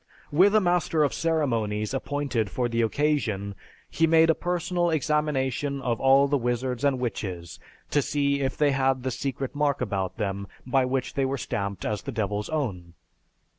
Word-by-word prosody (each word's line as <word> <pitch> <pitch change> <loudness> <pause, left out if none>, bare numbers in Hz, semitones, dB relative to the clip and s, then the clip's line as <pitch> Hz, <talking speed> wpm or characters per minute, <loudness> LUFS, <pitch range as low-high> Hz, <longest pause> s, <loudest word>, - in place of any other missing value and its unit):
With 190 +8 +5
a - - +7
master 175 -4 +2
of 145 - +1
ceremonies 115 -10 0
appointed 135 -6 -1
for 120 +7 -1
the 115 0 0
occasion, 115 -6 0 0.3
he 165 - +1
made 165 0 +5
a - - +2
personal 175 0 -1
examination 145 -3 0
of 120 -4 -1
all 135 +1 +5
the 140 0 +1
wizards 125 +1 -2
and 140 -2 +3
witches, 95 -8 -4 0.3
to 145 - +3
see 140 0 0
if 130 -1 -2
they 145 -1 +3
had 135 -1 +1
the 130 - -1
secret 135 +1 -3
mark 145 -1 +1
about 100 -6 -2
them 100 -2 -3 0.2
by 130 0 +2
which 130 0 -2
they 140 - 0
were 135 +1 -1
stamped 100 -5 -3
as 105 -1 -2
the 140 - -5
Devil's 105 -3 -2
own. 95 - -3
135 Hz, 170 wpm, -26 LUFS, 110-145 Hz, 0.3 s, a